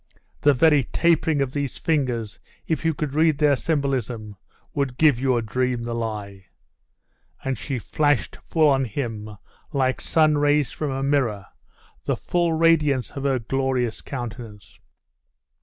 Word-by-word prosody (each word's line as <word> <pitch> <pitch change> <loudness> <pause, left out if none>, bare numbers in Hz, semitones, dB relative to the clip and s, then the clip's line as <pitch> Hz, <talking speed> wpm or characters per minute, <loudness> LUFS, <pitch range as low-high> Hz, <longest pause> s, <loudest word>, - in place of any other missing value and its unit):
The 145 -1 +4
very 150 +1 +4
tapering 160 -2 +2
of 130 -1 -5
these 145 -3 -3
fingers, 125 -9 -1 0.3
if 160 -2 -2
you 160 -1 +1
could 145 -2 -3
read 155 -1 +3
their 150 -1 +4
symbolism, 125 -8 -2 0.4
would 140 -3 -2
give 150 -6 +4
your 130 -3 +1
dream 125 +1 -1
the 120 0 -4
lie.' 105 -4 -5 1.0
And 135 -1 -1
she 130 +3 -4
flashed 145 +3 0
full 160 -2 +2
on 135 -2 +3
him, 110 -4 -5 0.3
like 130 -2 0
sun 155 -2 +3
rays 145 -1 +2
from 150 - -3
a 135 0 -2
mirror, 130 -9 0 0.6
the - - 0
full 175 -2 0
radiance 155 -5 +2
of 140 0 -6
her 135 -2 +2
glorious 125 -1 -1
countenance. 120 -5 -8
135 Hz, 140 wpm, -23 LUFS, 120-150 Hz, 1.0 s, The